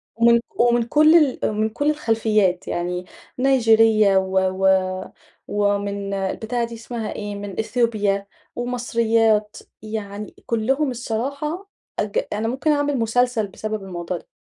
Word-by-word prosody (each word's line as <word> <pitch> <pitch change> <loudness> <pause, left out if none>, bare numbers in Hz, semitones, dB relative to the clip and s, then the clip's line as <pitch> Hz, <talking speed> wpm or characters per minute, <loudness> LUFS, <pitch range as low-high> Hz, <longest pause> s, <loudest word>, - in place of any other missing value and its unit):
ومن 235 +1 +5
ك 235 - -18
ومن 240 0 +3
كل 305 +6 +5
ال 300 -6 +4
ومن 215 +1 0
كل 290 +7 -1
الخلفيات 220 -9 +1
يعني، 180 +1 -3 0.3
نيجيرية 225 -6 +4
و 190 0 +1
و 190 0 +1 0.8
ومن 200 -1 -1
البتاع 220 +5 -2
دي 235 0 -5
اسمها 230 -1 -5
إيه 205 -1 -5
من 200 -2 -6
أثيوبيا، 215 -3 0 0.3
ومصريات، 230 -3 +1 0.3
يعني 210 -1 -6
كلهم 265 +5 0
الصراحة 280 - -4 0.3
أج 205 -1 -1
أنا 215 +2 -1
ممكن 265 +6 0
أعمل 290 -1 +1
مسلسل 230 -1 +1
بسبب 215 +1 -5
الموضوع 175 -1 -4
ده، - - -15
220 Hz, 130 wpm, -22 LUFS, 205-245 Hz, 0.8 s, ومن